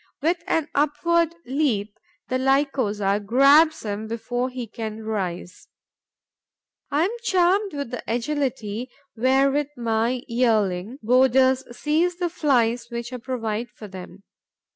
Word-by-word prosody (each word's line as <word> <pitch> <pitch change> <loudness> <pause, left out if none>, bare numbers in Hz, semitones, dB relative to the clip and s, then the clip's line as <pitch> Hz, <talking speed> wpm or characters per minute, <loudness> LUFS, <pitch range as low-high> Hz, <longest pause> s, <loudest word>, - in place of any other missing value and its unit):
With 335 +3 0
an 320 -2 +1
upward 330 +3 +1
leap, 240 -7 -1 0.3
the 255 - -1
Lycosa 255 -7 +1
grabs 280 +8 +5
him 210 0 -4
before 245 +3 -2
he 250 -1 -5
can 220 -1 -6
rise. 185 -4 -4 1.2
I 295 +3 +2
am 380 - 0
charmed 380 -1 +2
with 280 -4 -4
the 245 - -5
agility 245 -2 -2 0.3
wherewith 270 +4 +2
my 235 +2 0
yearling 220 -3 +1
boarders 260 +2 +4
seize 330 +4 +1
the 350 -1 -2
Flies 245 -7 +1
which 235 +1 -5
I - - -3
provide 235 -2 -3
for 210 0 -11
them. 190 0 -11
250 Hz, 120 wpm, -23 LUFS, 220-285 Hz, 1.2 s, grabs